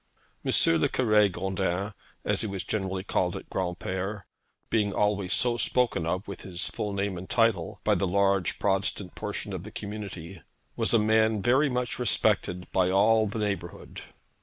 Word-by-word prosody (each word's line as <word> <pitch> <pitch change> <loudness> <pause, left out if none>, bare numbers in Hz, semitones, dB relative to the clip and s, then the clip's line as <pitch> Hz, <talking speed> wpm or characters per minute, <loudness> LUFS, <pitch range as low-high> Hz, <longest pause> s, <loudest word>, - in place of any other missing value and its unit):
M. - - 0 0.3
le - - +3
Cure 105 -5 +3
Gondin, 95 +2 -2 0.3
as - - +1
he 110 - -1
was 100 -2 -4
generally 95 -3 -2
called - - 0
at - - -7
Granpere, 95 +2 -3 0.5
being 105 -3 +1
always 100 -3 0
so 120 +3 +3
spoken 120 -9 +1
of, 90 +4 -2
with 100 - -7
his 90 -2 -1
full 105 - -3
name 100 -2 -2
and 95 - -10
title, 115 -8 +1
by - - +3
the 95 - +1
large 100 -1 +1
Protestant 95 -1 -1
portion 105 -1 -5
of 90 - -4
the 105 - -9
community, 100 -5 -7 0.3
was - - +2
a - - +7
man 110 -1 +2
very 135 +6 +4
much 125 -1 -2
respected 90 -6 +1
by 90 -1 +2
all 110 +3 +4
the 105 - -4
neighbourhood. 100 -5 -4
100 Hz, 165 wpm, -27 LUFS, 95-110 Hz, 0.5 s, a